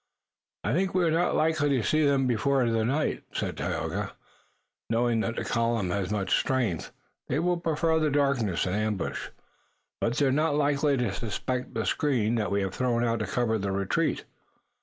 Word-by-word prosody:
"I -, -, 0 dB
think 185 Hz, +4 st, 0 dB
we 185 Hz, -, +3 dB
are 165 Hz, -, +2 dB
not 170 Hz, +2 st, +2 dB
likely 155 Hz, -2 st, +2 dB
to 115 Hz, -, -1 dB
see 155 Hz, +8 st, +2 dB
them 140 Hz, -2 st, +3 dB
before 125 Hz, +2 st, +2 dB
the 115 Hz, -1 st, +1 dB
night," 140 Hz, +7 st, 0 dB
said -, -, -2 dB
Tayoga. 80 Hz, +6 st, -3 dB, 0.8 s
"Knowing 115 Hz, 0 st, +2 dB
that 115 Hz, +1 st, -1 dB
the -, -, -2 dB
column 115 Hz, -5 st, 0 dB
has 95 Hz, -1 st, -1 dB
much 105 Hz, -2 st, +1 dB
strength, 120 Hz, -, -1 dB, 0.4 s
they 135 Hz, -, 0 dB
will 175 Hz, +2 st, +1 dB
prefer 160 Hz, -1 st, +1 dB
the 155 Hz, -1 st, +2 dB
darkness 140 Hz, -10 st, +1 dB
and 90 Hz, -, -1 dB
ambush." 105 Hz, -3 st, -2 dB, 0.7 s
"But 115 Hz, +1 st, 0 dB
they're 140 Hz, -3 st, +3 dB
not 150 Hz, +2 st, +2 dB
likely 145 Hz, -1 st, +2 dB
to 120 Hz, -6 st, 0 dB
suspect 125 Hz, +4 st, -3 dB
the 110 Hz, -, -1 dB
screen 125 Hz, -7 st, +1 dB
that 110 Hz, -3 st, 0 dB
we 100 Hz, 0 st, +1 dB
have 95 Hz, -1 st, -2 dB
thrown 120 Hz, 0 st, 0 dB
out 115 Hz, -1 st, +1 dB
to 110 Hz, -, -2 dB
cover 115 Hz, -3 st, 0 dB
the 100 Hz, 0 st, -2 dB
retreat." 100 Hz, 0 st, 0 dB
120 Hz, 180 wpm, -27 LUFS, 110-145 Hz, 0.8 s, we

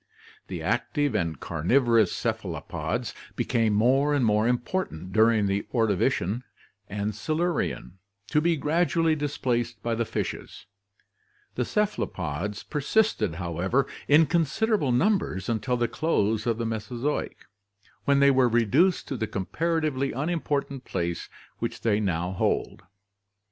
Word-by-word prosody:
The -, -, -5 dB
active 145 Hz, -5 st, 0 dB
and 85 Hz, -8 st, -1 dB
carnivorous 115 Hz, -, +2 dB
cephalopods -, -, -3 dB, 0.2 s
became 115 Hz, -3 st, +1 dB
more 135 Hz, +7 st, +3 dB
and 135 Hz, -4 st, +2 dB
more 105 Hz, +1 st, +3 dB
important 120 Hz, -, -2 dB
during 110 Hz, -1 st, +4 dB
the 100 Hz, +1 st, -1 dB
Ordovician 110 Hz, -1 st, +1 dB, 0.5 s
and 105 Hz, +1 st, -2 dB
Silu 155 Hz, -, 0 dB
rian, 90 Hz, -, -3 dB, 0.3 s
to 150 Hz, -, +3 dB
be 170 Hz, 0 st, +2 dB
gradually 165 Hz, +2 st, +2 dB
displaced 120 Hz, -6 st, -2 dB
by 115 Hz, -, 0 dB
the 115 Hz, +1 st, 0 dB
fishes; -, -, -5 dB, 0.9 s
the 125 Hz, -, -1 dB
cephalopods 105 Hz, -, -2 dB
per 150 Hz, -, -3 dB
sisted, 140 Hz, -, +1 dB
however, 90 Hz, +9 st, 0 dB, 0.2 s
in 155 Hz, +3 st, +6 dB
considerable 170 Hz, -, +1 dB
numbers 125 Hz, -, +1 dB
until 115 Hz, +2 st, 0 dB
the 120 Hz, 0 st, +1 dB
close 110 Hz, -7 st, 0 dB
of 115 Hz, -2 st, +1 dB
the 115 Hz, -, -2 dB
Mesozoic, 115 Hz, +6 st, -3 dB, 0.6 s
when 140 Hz, 0 st, +4 dB
they 140 Hz, 0 st, +6 dB
were 130 Hz, -2 st, +4 dB
reduced 125 Hz, -, +3 dB
to 135 Hz, -, -3 dB
the 110 Hz, -1 st, -2 dB
comparatively 150 Hz, -, -1 dB
unim 160 Hz, +6 st, -2 dB
portant 140 Hz, -3 st, -2 dB
place 85 Hz, -5 st, -3 dB, 0.3 s
which -, -, -4 dB
they 110 Hz, -2 st, +2 dB
now 90 Hz, -3 st, -1 dB
hold. 95 Hz, -, -1 dB
120 Hz, 130 wpm, -26 LUFS, 105-150 Hz, 0.9 s, in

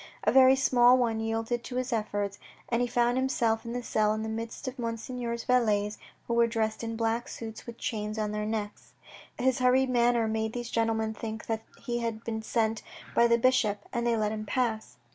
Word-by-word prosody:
A -, -, +3 dB
very 265 Hz, 0 st, +7 dB
small 250 Hz, -1 st, +5 dB
one 230 Hz, -3 st, +1 dB
yielded 225 Hz, +2 st, -2 dB
to 250 Hz, -, -7 dB
his 255 Hz, 0 st, -1 dB
efforts, 205 Hz, -2 st, -2 dB, 0.3 s
and 235 Hz, 0 st, +1 dB
he 245 Hz, -, +1 dB
found 240 Hz, +1 st, +2 dB
himself 235 Hz, -4 st, +1 dB
in 235 Hz, +1 st, -5 dB
a 245 Hz, -, -3 dB
cell 215 Hz, -2 st, +2 dB
in 220 Hz, -, -3 dB
the 220 Hz, -, -3 dB
midst 230 Hz, +4 st, -5 dB
of 255 Hz, +1 st, -5 dB
Monseigneur's 235 Hz, 0 st, -3 dB
valets, 215 Hz, -5 st, +1 dB, 0.3 s
who 235 Hz, -, -1 dB
were 235 Hz, 0 st, +4 dB
dressed 220 Hz, -1 st, -1 dB
in 230 Hz, 0 st, -3 dB
black 230 Hz, +1 st, -1 dB
suits 225 Hz, 0 st, -8 dB
with 235 Hz, 0 st, -8 dB
chains 215 Hz, -1 st, -3 dB
on 210 Hz, -1 st, -1 dB
their 210 Hz, 0 st, -2 dB
necks. 210 Hz, -1 st, -4 dB, 0.4 s
His 260 Hz, +1 st, +1 dB
hurried 255 Hz, +1 st, +3 dB
manner 240 Hz, -2 st, +3 dB
made 220 Hz, 0 st, -1 dB
these 240 Hz, -1 st, -5 dB
gentlemen 225 Hz, -1 st, 0 dB
think 220 Hz, 0 st, -6 dB
that 225 Hz, -1 st, -2 dB, 0.2 s
he 240 Hz, -2 st, -2 dB
had 230 Hz, -1 st, -3 dB
been 220 Hz, -1 st, -3 dB
sent 220 Hz, -1 st, 0 dB, 0.3 s
by 235 Hz, -, +5 dB
the 235 Hz, 0 st, +4 dB
bishop, 235 Hz, -4 st, +2 dB
and 240 Hz, -1 st, 0 dB
they 235 Hz, -1 st, +2 dB
let 215 Hz, -1 st, 0 dB
him 215 Hz, 0 st, -4 dB
pass. 220 Hz, -, -1 dB
230 Hz, 205 wpm, -29 LUFS, 220-245 Hz, 0.4 s, very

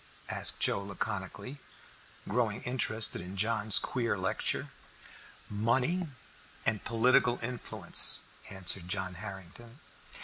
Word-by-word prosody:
asked -, -, +2 dB
Joe -, -, +2 dB
laconically, 100 Hz, +6 st, -6 dB, 0.7 s
growing 110 Hz, -4 st, -1 dB
interested 115 Hz, -5 st, +1 dB
in 90 Hz, +2 st, -8 dB
John's 105 Hz, -1 st, +3 dB
queer 120 Hz, -4 st, 0 dB
lecture. 95 Hz, -, -2 dB, 0.8 s
"Money 125 Hz, -, 0 dB, 0.6 s
and 110 Hz, -2 st, 0 dB
political 120 Hz, +1 st, +3 dB
influence," 120 Hz, +1 st, +3 dB, 0.3 s
answered 95 Hz, -2 st, +1 dB
John 95 Hz, 0 st, 0 dB
Harrington. 100 Hz, -, -9 dB
110 Hz, 95 wpm, -30 LUFS, 95-120 Hz, 0.8 s, John's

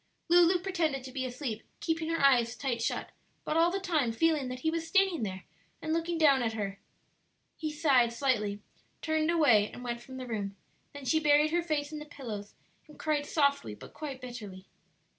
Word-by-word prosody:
Lulu 350 Hz, +1 st, +6 dB
pretended 340 Hz, -7 st, -1 dB
to 260 Hz, -, -8 dB
be 260 Hz, 0 st, -3 dB
asleep, 245 Hz, -3 st, -4 dB, 0.2 s
keeping 325 Hz, -1 st, -1 dB
her 330 Hz, -, 0 dB
eyes 240 Hz, -3 st, +4 dB
tight 245 Hz, -4 st, -2 dB
shut, 230 Hz, -, -2 dB, 0.3 s
but 305 Hz, -, -1 dB
all 335 Hz, +1 st, +5 dB
the 385 Hz, +2 st, -2 dB
time 315 Hz, -11 st, +1 dB
feeling 300 Hz, +3 st, +1 dB
that 255 Hz, 0 st, -6 dB
he 320 Hz, -, +1 dB
was 325 Hz, 0 st, -3 dB
standing 385 Hz, -5 st, +3 dB
there 190 Hz, -3 st, -4 dB, 0.4 s
and 315 Hz, -, -2 dB
looking 335 Hz, +1 st, -1 dB
down 285 Hz, -5 st, +5 dB
at 225 Hz, -2 st, 0 dB
her. 200 Hz, -2 st, -4 dB, 0.8 s
He 310 Hz, -1 st, -3 dB
sighed 275 Hz, -6 st, +3 dB
slightly, 220 Hz, -6 st, 0 dB, 0.4 s
turned 315 Hz, 0 st, +1 dB
away, 265 Hz, -11 st, +4 dB
and 245 Hz, -, -9 dB
went 240 Hz, -1 st, -4 dB
from 260 Hz, +1 st, -10 dB
the 255 Hz, -, -5 dB
room; 205 Hz, -4 st, -3 dB, 0.4 s
then 285 Hz, -1 st, -9 dB
she 315 Hz, +5 st, +3 dB
buried 300 Hz, 0 st, +4 dB
her 345 Hz, +1 st, +2 dB
face 305 Hz, -3 st, -2 dB
in 305 Hz, -, -5 dB
the 300 Hz, -, -8 dB
pillows 225 Hz, -9 st, -7 dB, 0.3 s
and 300 Hz, -, -15 dB
cried 300 Hz, -2 st, -1 dB
softly 280 Hz, -, +1 dB
but -, -, -13 dB
quite 285 Hz, -4 st, -6 dB
bitterly. 215 Hz, -7 st, -8 dB
280 Hz, 195 wpm, -30 LUFS, 235-320 Hz, 0.8 s, Lulu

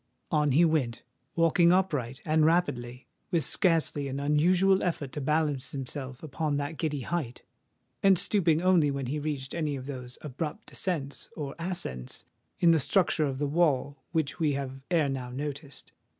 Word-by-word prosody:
On 150 Hz, -2 st, +2 dB
he 165 Hz, +5 st, +6 dB
went—walking 165 Hz, +4 st, +1 dB
upright, 145 Hz, -10 st, 0 dB
and 155 Hz, 0 st, +3 dB
rapidly—with 155 Hz, 0 st, -1 dB
scarcely 160 Hz, -5 st, +2 dB
an 135 Hz, +1 st, -4 dB
unusual 180 Hz, +7 st, +3 dB
effort 155 Hz, -6 st, -2 dB
to 150 Hz, -, -5 dB
balance 145 Hz, -2 st, 0 dB
himself 135 Hz, 0 st, -6 dB
upon 150 Hz, 0 st, -2 dB
that 145 Hz, +2 st, -4 dB
giddy 150 Hz, -4 st, -1 dB
height,—and 130 Hz, +2 st, -2 dB
stooping 175 Hz, -3 st, +2 dB
only 180 Hz, -5 st, +4 dB
when 140 Hz, -1 st, -2 dB
he 145 Hz, +5 st, -2 dB
reached 145 Hz, -3 st, -4 dB
any 155 Hz, -4 st, -1 dB
of 130 Hz, -1 st, -7 dB
those 125 Hz, -3 st, -7 dB
abrupt 155 Hz, -, -5 dB
descents 150 Hz, -7 st, -3 dB
or 145 Hz, -3 st, -4 dB
ascents 65 Hz, -, -4 dB, 0.3 s
in 170 Hz, -, +5 dB
the 165 Hz, -, +4 dB
structure 170 Hz, +1 st, +2 dB
of 135 Hz, -2 st, -2 dB
the 145 Hz, -, -1 dB
wall 145 Hz, -3 st, +1 dB
which 155 Hz, -4 st, -1 dB
we 155 Hz, -3 st, +2 dB
have 135 Hz, -1 st, -4 dB
ere 165 Hz, -5 st, +3 dB
now 130 Hz, -2 st, -3 dB
noticed. 140 Hz, +1 st, -6 dB
150 Hz, 150 wpm, -28 LUFS, 135-165 Hz, 0.3 s, he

